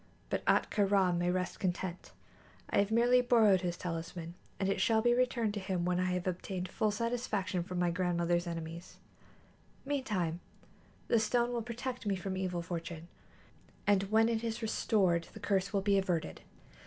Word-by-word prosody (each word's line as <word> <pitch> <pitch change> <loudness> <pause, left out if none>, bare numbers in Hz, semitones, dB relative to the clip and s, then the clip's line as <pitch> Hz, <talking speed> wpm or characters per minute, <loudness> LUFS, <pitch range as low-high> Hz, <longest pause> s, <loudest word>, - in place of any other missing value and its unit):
But - - -1
Ahtka 205 -2 +2
Rā 190 -3 +3
may 175 +1 +1
rest 180 0 -2
content; 180 -1 -3 0.6
I - - +3
have 200 0 +2
merely 240 +3 +4
borrowed 220 -6 +4
his 175 -2 -2
talisman, 165 0 -5 0.3
and 195 - 0
it 195 - 0
shall 225 -1 +3
be 240 +2 +3
returned 240 -3 +1
to 205 - -3
him 185 -3 -2
when 180 0 +1
I 185 0 +1
have 180 -1 -2
obtained 185 0 -3
full 215 - 0
satisfaction 210 -4 -1
from 180 +1 -5
my 175 -1 +2
grandmother's 175 -1 0
enemies. 165 +1 -6 0.9
Meantime, 210 - -1 0.7
the 230 - +4
stone 240 +2 +1
will 235 - -1
protect 240 +1 -5
me 200 - +2
from 190 +1 -4
evil 180 -2 -2
fortune, 170 -1 -6 0.8
and 195 -1 +2
when 220 +1 +4
it 230 -1 -1
is 230 0 -3
restored 190 -6 +1
the - - -9
curse 195 -2 0
will 200 -2 +1
be 200 0 +3
averted." 180 -4 -2
190 Hz, 170 wpm, -32 LUFS, 175-220 Hz, 0.9 s, merely